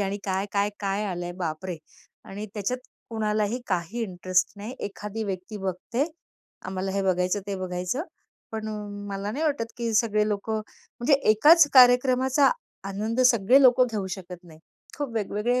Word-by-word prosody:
आणि 200 Hz, 0 st, -1 dB
काय, 190 Hz, +1 st, -1 dB
काय, 200 Hz, 0 st, +1 dB
काय 200 Hz, +1 st, -1 dB
आलंय, 175 Hz, -3 st, -4 dB
बापरे! 170 Hz, +2 st, -3 dB, 0.5 s
आणि 205 Hz, +2 st, -7 dB
त्याच्यात 215 Hz, +4 st, -2 dB, 0.3 s
कुणालाही 215 Hz, +1 st, 0 dB
काही 185 Hz, +5 st, -2 dB
इंटरेस्ट 185 Hz, -2 st, 0 dB
नाही. 215 Hz, +6 st, -7 dB
एखादी 210 Hz, +2 st, -5 dB
व्यक्ती 195 Hz, +2 st, -5 dB
बघते. 195 Hz, +7 st, -2 dB, 0.6 s
आम्हाला 190 Hz, +1 st, -3 dB
हे 200 Hz, 0 st, 0 dB
बघायचं, 185 Hz, +1 st, +1 dB
ते 200 Hz, -1 st, -3 dB
बघायचं, 180 Hz, -, -2 dB, 0.5 s
पण 220 Hz, 0 st, -4 dB
अ, -, -, -4 dB, 0.4 s
मला 200 Hz, +1 st, -3 dB
नाही 300 Hz, +8 st, -2 dB
वाटत 255 Hz, -7 st, -1 dB
की 235 Hz, -1 st, -2 dB
सगळे 215 Hz, -1 st, +2 dB
लोक 205 Hz, +1 st, -3 dB
म्हणजे 220 Hz, +5 st, -1 dB, 0.2 s
एकाच 300 Hz, +9 st, +7 dB
कार्यक्रमाचा 255 Hz, +2 st, +6 dB, 0.4 s
आनंद 215 Hz, +5 st, -2 dB
सगळे 250 Hz, +2 st, +5 dB
लोक 255 Hz, 0 st, +6 dB
घेऊ 205 Hz, -3 st, -2 dB
शकत 180 Hz, -1 st, -10 dB
नाही. 160 Hz, -2 st, -15 dB, 0.4 s
खूप 285 Hz, -4 st, -2 dB
वेगवेगळे 225 Hz, +3 st, 0 dB
210 Hz, 150 wpm, -26 LUFS, 190-235 Hz, 0.6 s, एकाच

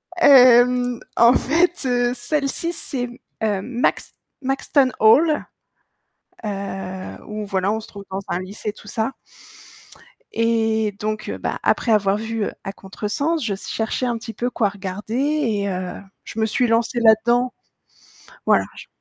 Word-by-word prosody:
Hem, 250 Hz, -5 st, +6 dB, 0.2 s
en 235 Hz, +1 st, +7 dB
fait, 340 Hz, +2 st, +1 dB
heu, 245 Hz, -1 st, +1 dB
celle-ci, 285 Hz, +6 st, -2 dB
c'est 255 Hz, -6 st, -3 dB
mmh, 240 Hz, 0 st, -12 dB, 0.3 s
heu, 205 Hz, -3 st, 0 dB
Max 245 Hz, +4 st, -1 dB, 0.3 s
Maxton 270 Hz, 0 st, +1 dB
Hall, 295 Hz, +8 st, +5 dB, 1.0 s
heu, 195 Hz, -2 st, -5 dB
où 210 Hz, 0 st, -5 dB
voilà, 195 Hz, 0 st, 0 dB
on 220 Hz, -, -1 dB
se 220 Hz, -, -10 dB
trouve 200 Hz, -1 st, -11 dB
dans 190 Hz, +1 st, -3 dB
un 175 Hz, -, -1 dB
lycée, 200 Hz, +3 st, -5 dB
tout 205 Hz, -, -15 dB
ça 220 Hz, +4 st, -1 dB, 1.2 s
et 225 Hz, -2 st, +1 dB
donc 215 Hz, 0 st, -3 dB
heu, -, -, -4 dB
bah -, -, -3 dB
après 230 Hz, -, +2 dB
avoir 200 Hz, -2 st, +3 dB
vu, 225 Hz, 0 st, -2 dB
heu, -, -, -3 dB
À 195 Hz, -, -5 dB
Contresens, 220 Hz, -, -2 dB
je 210 Hz, -, 0 dB
s 195 Hz, -, -6 dB
cherchais 225 Hz, +3 st, -1 dB
un 240 Hz, -1 st, -1 dB
petit 225 Hz, 0 st, -7 dB
peu 240 Hz, +4 st, -2 dB
quoi 215 Hz, -4 st, +1 dB
regarder 200 Hz, +2 st, -6 dB
et 255 Hz, -8 st, 0 dB
heu, 185 Hz, -1 st, -3 dB, 0.3 s
je 225 Hz, -, -7 dB
me 220 Hz, -, +3 dB
suis 230 Hz, +3 st, +1 dB
lancée 230 Hz, +1 st, +2 dB
là-dedans, 235 Hz, +2 st, +4 dB, 0.9 s
voilà -, -, +4 dB
j -, -, -10 dB
225 Hz, 155 wpm, -21 LUFS, 205-250 Hz, 1.2 s, en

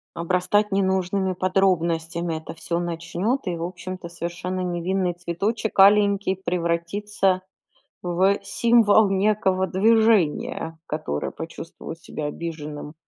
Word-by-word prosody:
Обрастать 185 Hz, +5 st, +1 dB
ненужными 190 Hz, 0 st, +1 dB
подробностями 170 Hz, -3 st, 0 dB
это 160 Hz, -, -9 dB
всё 170 Hz, +1 st, -3 dB
начнет, 175 Hz, +9 st, -2 dB
и, 175 Hz, -, -1 dB
в 165 Hz, -, -6 dB
общем-то, 180 Hz, +1 st, -6 dB
совершенно 175 Hz, +2 st, -4 dB
невинный 180 Hz, +1 st, -1 dB
цветочек 195 Hz, +6 st, -3 dB
аленький 200 Hz, -1 st, +5 dB
превратится 185 Hz, +2 st, -1 dB, 0.6 s
в 185 Hz, +3 st, +2 dB
символ 220 Hz, 0 st, +4 dB
некого 195 Hz, -1 st, +1 dB
движения, 195 Hz, -6 st, +2 dB
которое 150 Hz, -, -3 dB
почувствовал 165 Hz, 0 st, -8 dB
себя 155 Hz, -2 st, -6 dB
обиженным. 150 Hz, -2 st, -6 dB
185 Hz, 100 wpm, -24 LUFS, 170-195 Hz, 0.6 s, аленький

